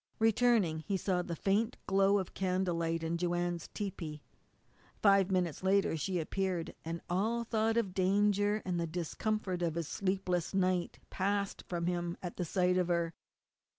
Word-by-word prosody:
Returning 220 -7 +3
he 195 +5 -2
saw 185 -1 0
the 170 -1 -4
faint 210 +7 +1
glow 195 +1 +4
of 190 -3 -3
candlelight 175 -3 0
in 165 +1 -1
Joanne's 175 -1 -1
tepee. 170 -7 -5 0.8
Five 195 -2 +5
minutes 180 -4 0
later 195 -2 +2
she 180 +4 -1
appeared, 180 +1 -2
and 165 +1 -4
all 220 +6 0
thought 225 0 +1
of 200 -6 0
danger, 205 +2 +2
and 180 -2 -1
the 170 - -1
discomfort 180 +3 -2
of 165 -2 0
his 170 -3 -2
sleepless 185 -2 -1
night, 185 -2 +1
passed 200 +1 -1
from 170 -1 -2
him 175 -1 -1
at 180 0 -3
sight 180 +1 +2
of 180 - +1
her. 170 -1 0
185 Hz, 150 wpm, -33 LUFS, 170-200 Hz, 0.8 s, Five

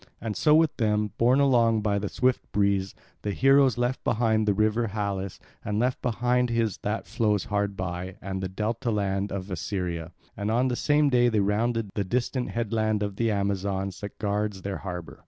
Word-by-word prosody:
And 110 -1 -4
so 150 -1 +4
with 160 -1 +3
them, 105 -2 +1
borne 125 +4 +4
along 115 -5 +3
by 100 -1 +1
the 100 0 -3
swift 130 0 0
breeze, 100 -2 +1 0.3
the 105 - -3
heroes 135 +1 +4
left 125 +2 -1
behind 110 -1 +1
the 105 - +4
river 110 +3 +2
Halys, 100 -2 -3 0.3
and 105 0 -2
left 125 +3 0
behind 125 +1 +1
his 115 -4 0
that 105 +2 -3
flows 105 -4 0
hard 100 -1 -1
by, 90 0 -4
and 95 0 -4
the 95 - -3
delta 115 +6 -2
land 100 -2 -1
of 95 0 -5
Assyria; 85 0 -3 0.2
and 100 +1 -3
on 125 +4 +2
the 125 - -1
same 145 +2 +3
day 120 -1 +4
they 110 -2 +1
rounded 110 +1 0
the 100 - -1
distant 125 +4 -1
headland 110 -2 0
of 100 -1 -4
the 115 -1 +1
Amazons 100 -2 -1
that 100 -1 -7
guards 105 -2 -2
their 100 -1 -3
harbour. 90 -6 -7
105 Hz, 190 wpm, -26 LUFS, 100-120 Hz, 0.3 s, so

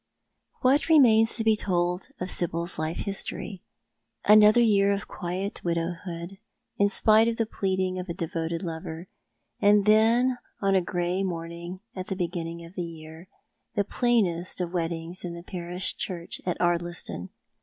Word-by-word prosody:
What 275 +5 +3
remains 230 -8 +6
to 225 - +1
be 220 -1 +4
told 180 -2 -1
of 180 0 -3
Sibyl's 170 0 -1
life 155 +1 -2
history? 195 -1 -4 0.6
Another 210 +2 +7
year 200 -4 +4
of 200 +1 -4
quiet 185 +4 -4
widowhood, 170 +2 -3 0.4
in 200 0 +4
spite 220 +2 +4
of 230 -1 -1
the 225 - +1
pleading 190 -3 -1
of 180 0 -6
a 170 - -3
devoted 165 +1 -3
lover; 165 0 -6 0.5
and 205 0 +5
then, 230 +4 +4 0.2
on 195 -1 +2
a 190 - +4
grey 175 +1 -1
morning 170 0 -5
at 185 -1 -5
the 190 - -2
beginning 170 -2 -4
of 165 - -14
the 185 - -4
year, 160 0 -9 0.5
the 205 - +2
plainest 200 -7 0
of 180 -1 -3
weddings 170 0 -1
in 175 -1 -5
the 170 - -9
i^arish 180 0 -4
church 175 -3 -5
at 180 - 0
Ardliston. 175 - -1
180 Hz, 155 wpm, -27 LUFS, 170-205 Hz, 0.6 s, Another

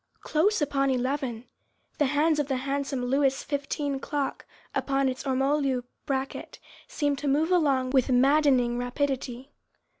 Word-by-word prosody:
Close 345 +3 +1
upon 275 -1 +1
eleven! 255 -2 -1 0.5
the 295 - +3
hands 300 +3 +2
of 290 - 0
the 270 - 0
handsome 275 -1 -2
Louis 270 +1 +2
XV. 285 -1 -2
clock 285 -2 -3 0.3
upon 275 -1 +1
its 260 +1 -3
ormolu 270 -1 +1 0.2
bracket 270 -1 -3 0.3
seemed 290 -2 -1
to 290 - -3
move 305 +5 +2
along 275 -7 +2
with 265 -1 +2
maddening 260 -2 +3
rapidity. 260 0 -3
275 Hz, 130 wpm, -27 LUFS, 260-290 Hz, 0.5 s, the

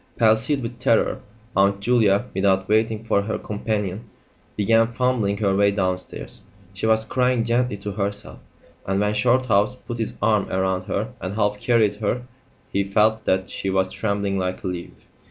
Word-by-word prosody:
Palsied 115 +5 +3
with 115 +1 -6
terror, 115 -2 +2 0.4
Aunt 100 0 +3
Julia, 110 -1 +3
without 95 0 +1
waiting 110 +1 +1
for 110 -3 +1
her 110 +2 -3
companion, 105 0 -3 0.5
began 115 +3 +3
fumbling 115 -5 0
her 100 -2 +1
way 100 +1 +4
downstairs; 95 -2 -3 0.3
she 100 +3 -2
was 110 0 +3
crying 125 +1 +1
gently 120 -1 0
to 100 +1 -5
herself, 100 0 -4 0.5
and 95 0 0
when 105 0 +1
Shorthouse 120 -1 +2
put 120 -2 -8
his 110 - -3
arm 105 -3 +2
round 95 0 -1
her - - -3
and 95 +2 -4
half 105 -1 0
carried 110 -4 +2
her 110 +3 -1 0.5
he 100 - +2
felt 110 +3 +2
that 95 0 0
she 95 - -3
was 95 0 +1
trembling 100 -2 -1
like 90 0 -3
a - - -2
leaf. 90 -1 -6
105 Hz, 165 wpm, -23 LUFS, 100-115 Hz, 0.5 s, way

